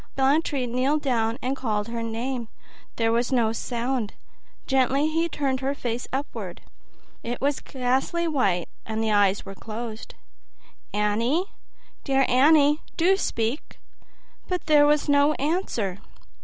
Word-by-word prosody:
Blantyre 275 0 +2
kneeled 260 +5 0
down 230 -4 +1
and 260 +2 0
called 215 -6 -2
her 230 0 -3
name: 230 +1 -3 0.5
there 225 -1 +1
was 235 +2 +1
no 230 -4 +2
sound. 240 -1 -2 0.5
Gently 270 +2 +2
he 330 +2 +1
turned 270 -4 -1
her 270 +2 -1
face 240 -3 -3
upward: 275 +2 -5 0.6
it 240 +1 -4
was 280 +1 0
ghastly 265 +7 -1
white 200 - +1 0.2
and 220 0 -3
the 220 - +1
eyes 205 -1 +3
were 195 - -7
closed. 220 +2 -7 0.8
"Annie, 230 - 0 0.5
dear 270 -1 +2
Annie, 295 +3 +5 0.2
do 360 +4 +4
speak!" 230 - -2 0.7
But 365 -1 -2
there 295 -1 +6
was 295 0 +2
no 285 +1 +4
answer. 275 - -1
255 Hz, 130 wpm, -25 LUFS, 225-290 Hz, 0.8 s, there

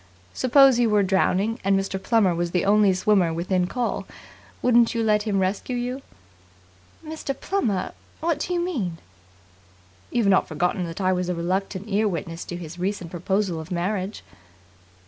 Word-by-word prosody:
Suppose 265 -1 +5
you 235 -2 +3
were 210 -1 +3
drowning 195 +3 +1
and 195 0 +3
Mr. 195 0 -3
Plummer 205 -4 +3
was 170 0 -1
the 180 0 0
only 205 0 +5
swimmer 185 -2 +2
within 180 +2 0
call, 245 +3 -2 0.6
wouldn't 235 -1 +4
you 230 - 0
let 210 0 +2
him 200 -2 +1
rescue 195 +6 -1
you?" 250 +2 -3 1.0
"Mr. 310 -3 -5
Plummer? 215 - -1 0.3
What 320 -2 0
do 360 - -3
you - - +1
mean?" 245 - -2 1.1
"You've 235 -3 0
not 195 -1 +3
forgotten 175 +3 -1
that 165 +4 -6
I 185 0 +2
was 180 0 -2
a 180 - -1
reluctant 190 +3 -2
ear 210 +1 +1
witness 165 -2 -4
to 175 - -6
his 170 0 -8
recent 185 -2 -3
proposal 185 0 -1
of 160 +1 -8
marriage?" 185 +3 -3
195 Hz, 165 wpm, -24 LUFS, 180-230 Hz, 1.1 s, Suppose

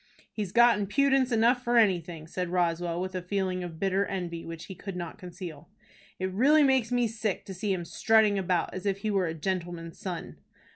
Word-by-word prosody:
"He's 205 -4 -3
got 235 0 +5
impudence 265 +5 +2
enough 235 +2 +3
for 240 0 +2
anything," 175 -7 +2
said 180 +2 -4
Roswell, 175 -1 0
with 185 +1 -3
a 185 - -3
feeling 185 0 -2
of 165 -2 -7
bitter 195 0 +1
envy 175 -4 -4
which 165 -1 -7
he 190 - -8
could 190 +1 -7
not 175 -2 -6
conceal. 175 -4 -9 0.5
"It 185 0 -2
really 290 +9 +5
makes 260 -4 +3
me 245 -1 +2
sick 215 -3 -3
to 195 - -7
see 195 +2 -2
him 180 -3 -2
strutting 215 +2 +3
about 180 -2 0
as 185 +2 -4
if 195 0 -1
he 215 0 -1
were 195 -3 +1
a 160 - -3
gentleman's 170 -1 -4
son." 180 -3 -6
190 Hz, 200 wpm, -28 LUFS, 175-220 Hz, 0.5 s, got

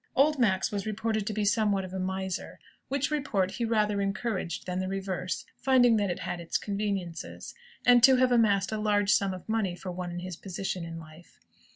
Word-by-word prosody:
Old 290 +1 +4
Max 190 -6 +2
was 205 0 -3
reported 215 -1 -1
to - - 0
be 210 0 -1
somewhat 205 -2 +2
of 185 - -9
a 190 - -3
miser 190 0 -3 0.3
(which 280 +2 -1
report 220 -11 0
he 235 - -2
rather 210 -3 +1
encouraged 195 -3 -2
than 180 0 -2
the 185 - -2
reverse, 190 -1 -3
finding 245 -3 +4
that 205 -2 +1
it 175 - -3
had 175 - -4
its 170 - -1
conveniences), 200 -5 -4 0.3
and 245 -1 +7
to 260 +2 +8
have 255 0 +3
amassed 205 -5 +3
a 220 - -2
large 205 -1 +2
sum 200 -2 +3
of 185 -1 -8
money 215 -5 0
for 180 +1 -6
one 180 0 -5
in 175 - -6
his 185 -1 -6
position 190 -1 -4
in 165 0 -6
life. 160 +1 -14
200 Hz, 205 wpm, -28 LUFS, 185-220 Hz, 0.3 s, to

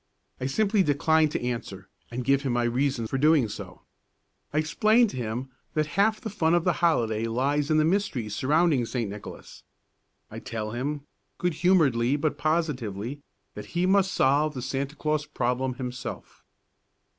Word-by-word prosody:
I 130 - -2
simply 205 +7 +2
decline 155 0 +3
to 145 - -3
answer 115 -6 -5 0.2
and 120 +1 -5
give 140 0 +3
him 135 -3 -1
my 120 0 +1
reason 125 0 0
for 135 - -2
so - - -3
doing. 150 -5 +4 1.0
I 150 - -2
explain 215 +10 +3
to - - -8
him 125 +2 -4 0.3
that 155 0 +2
half 215 +2 +2
the 220 -3 -6
fun 165 -4 +2
of 175 - +2
the 180 - +2
holiday 115 -10 +2
lies 140 +5 0
in 155 - +3
the 155 - +4
mystery 170 - 0
surrounding 145 - +2
St. 120 -3 -2
Nicholas. 100 0 -10 0.7
I - - -6
tell 110 -2 -5
him, 140 +5 -3 0.4
good 180 -1 0
humouredly 145 -7 +3
but 150 0 -1
positively, 145 - -2 0.3
that - - -8
he 175 - +3
must 190 0 +3
solve 145 +1 +2
the 125 - -4
Santa 135 +2 -3
Claus 150 -1 -1
problem 130 -2 -1
himself. 125 -1 -7
140 Hz, 165 wpm, -26 LUFS, 125-160 Hz, 1.0 s, doing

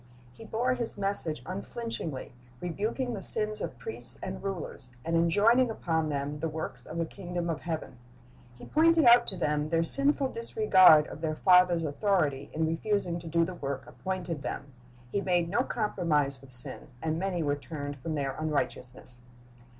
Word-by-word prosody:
He 225 - -13
bore 240 +4 -1
his 240 -4 -2
message 195 -6 +2
unflinchingly, 190 - -6 0.3
rebuking 220 +8 -3
the 200 - -6
sins 215 +2 +7
of - - -5
priests 450 - +3
and - - -6
rulers, 185 -9 -5 0.2
and 165 - -1
enjoining 210 +9 +3
upon 160 -7 -2
them 145 +1 -4
the 165 - -2
works 150 -6 -7
of 160 - -7
the 165 - -1
kingdom 175 -1 -5
of 160 - -5
heaven. 160 -7 -6 0.6
He - - -12
pointed 325 0 +3
out 240 0 +6
to 190 - +1
them 150 -2 -1
their 165 0 +1
sinful 275 - +1
disregard 190 -9 +5
of 155 - -10
their 155 -1 -2
Father's 180 -1 +4
authority, 145 -4 -1
in 160 +1 -1
refusing 175 +1 -2
to 170 - -11
do 165 +1 +1
the 185 - -6
work 140 -5 -5
appointed 180 -5 -5
them. 140 -1 -6 0.4
He 200 - -1
made 175 -3 0
no 205 +7 +1
compromise 155 - -1
with 135 - -16
sin, 125 +4 +2
and 160 +2 -2
many 185 -3 -2
were 145 -1 0
turned 145 -1 -7
from 155 +4 -4
their 140 -2 -2
unrighteousness. 130 -4 -4
170 Hz, 170 wpm, -28 LUFS, 150-205 Hz, 0.6 s, sins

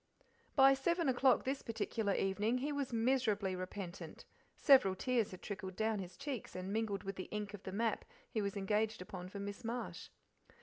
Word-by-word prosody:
By 270 -1 +8
seven 335 +5 +1
o'clock 260 0 +4
this 270 +1 -1
particular 225 -2 -1
evening 210 +5 +1
he 280 +4 -1
was 285 -3 -2
miserably 225 -5 +1
repentant; 185 0 -6 0.3
several 260 -10 +6
tears 240 0 +1
had 185 - -10
trickled 190 -2 -5
down, 220 0 0
his 180 -1 -7
cheeks 275 -6 -5
and 185 +2 -4
mingled 210 -3 -1
with 195 -1 -5
the 185 - -4
ink 210 -1 -4
of 205 - -7
the 190 - -6
map 220 +2 0 0.2
he 220 - -2
was 200 0 -2
engaged 210 +1 0
upon 180 0 -7
for 200 - -8
Miss 200 0 -5
Marsh. 235 +2 -4
210 Hz, 180 wpm, -36 LUFS, 195-250 Hz, 0.3 s, By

